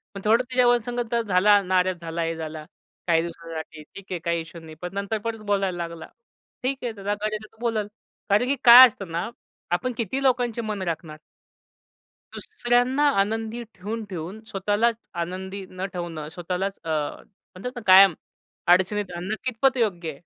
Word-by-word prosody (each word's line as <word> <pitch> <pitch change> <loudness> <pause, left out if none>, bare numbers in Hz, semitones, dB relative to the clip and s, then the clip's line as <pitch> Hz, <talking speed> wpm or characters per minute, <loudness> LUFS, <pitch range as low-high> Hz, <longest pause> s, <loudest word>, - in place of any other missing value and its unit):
मग 195 - -6
थोडं 230 +4 +4
त्याच्यावर 245 -1 +3
संगत 240 -1 -2
झाला 200 +2 +5
नाराज 185 -1 +1
झाला 165 0 -4
हे 165 0 -2
झाला, 155 -1 -6 0.4
काही 165 -1 +4
दिवसांसाठी, 165 -2 -7
ठीक 195 +5 -13
आहे, 180 - -2
काही 170 0 -1
इश्यू 165 +1 -11
नाही. 160 -1 -11
पण 180 +1 -5
नंतर 200 +2 -2
परत 230 -1 -3
बोलायला 195 -3 +1
लागला. 165 -1 -10 0.6
ठीक 265 +1 0
आहे 240 - -1
त्याला 205 0 -3
गरज 215 +1 -3
आहे 215 0 -4
तर 225 - -27
बोलेल. 225 -3 -1 0.4
कारण 210 +5 +4
की 280 - +2
काय 250 +2 +11
असतं 195 -6 -9
ना, 170 +6 -2 0.4
आपण 250 +8 0
किती 240 +4 -2
लोकांचे 245 -3 +1
मन 215 -3 -4
राखणार? 160 -3 -4 1.2
दुसऱ्यांना 245 +4 +1 0.2
आनंदी 225 +3 -1
ठेवून-ठेवून 200 -2 -6
स्वतःलाच 205 +4 +1 0.3
आनंदी 190 +2 -6
न 185 +1 -5
ठेवणं 165 -4 -5
स्वतःलाच 180 +3 -4
अ, 165 - -6
म्हणतात 185 +8 -5
ना 245 - -6
कायम 190 -1 +9 0.5
अडचणीत 190 +3 +3
आणणं 185 +5 -3
कितपत 260 +2 +1
योग्य 180 -8 0
आहे? - - -5
195 Hz, 165 wpm, -24 LUFS, 175-230 Hz, 1.2 s, काय